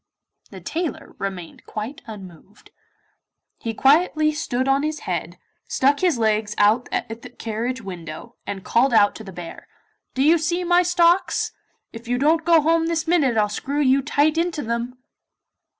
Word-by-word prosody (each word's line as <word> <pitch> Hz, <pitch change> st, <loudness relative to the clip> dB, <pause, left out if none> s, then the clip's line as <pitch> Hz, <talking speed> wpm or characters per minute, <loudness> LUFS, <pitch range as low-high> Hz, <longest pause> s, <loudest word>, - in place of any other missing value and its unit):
The -, -, -11 dB
tailor 335 Hz, -1 st, -4 dB
remained 190 Hz, -4 st, -6 dB
quite 220 Hz, +7 st, -6 dB
unmoved. 195 Hz, -3 st, -12 dB, 0.9 s
He 225 Hz, -1 st, -4 dB
quietly 305 Hz, +4 st, +3 dB
stood 270 Hz, -5 st, -2 dB
on 270 Hz, +1 st, +3 dB
his 305 Hz, +1 st, -3 dB
head, -, -, -4 dB, 0.3 s
stuck 280 Hz, +2 st, +2 dB
his 355 Hz, -8 st, +2 dB
legs 215 Hz, -1 st, 0 dB
out 215 Hz, +4 st, +3 dB
at 225 Hz, 0 st, -4 dB
the -, -, -10 dB
carriage 230 Hz, +2 st, -4 dB
window 180 Hz, +4 st, -8 dB
and 195 Hz, -2 st, -5 dB
called 245 Hz, +1 st, +2 dB
out 205 Hz, -2 st, +5 dB
to 220 Hz, -, -9 dB
the 195 Hz, -, -9 dB
bear, 175 Hz, -2 st, -9 dB, 0.5 s
'Do 265 Hz, -, +2 dB
you 325 Hz, +3 st, +5 dB
see 345 Hz, +3 st, -1 dB
my 350 Hz, 0 st, +4 dB
stocks? 350 Hz, +1 st, +2 dB, 0.4 s
If 230 Hz, +1 st, -10 dB
you 245 Hz, +1 st, 0 dB
don't 310 Hz, +5 st, +2 dB
go 330 Hz, -1 st, +5 dB
home 325 Hz, +2 st, +2 dB
this 325 Hz, -1 st, -1 dB
minute 290 Hz, -9 st, +2 dB
I'll 210 Hz, -1 st, +3 dB
screw 270 Hz, +7 st, -3 dB
you 275 Hz, -1 st, +3 dB
tight 295 Hz, +3 st, +1 dB
into 335 Hz, -3 st, -1 dB
them. 235 Hz, +2 st, -3 dB
260 Hz, 165 wpm, -22 LUFS, 220-320 Hz, 0.9 s, out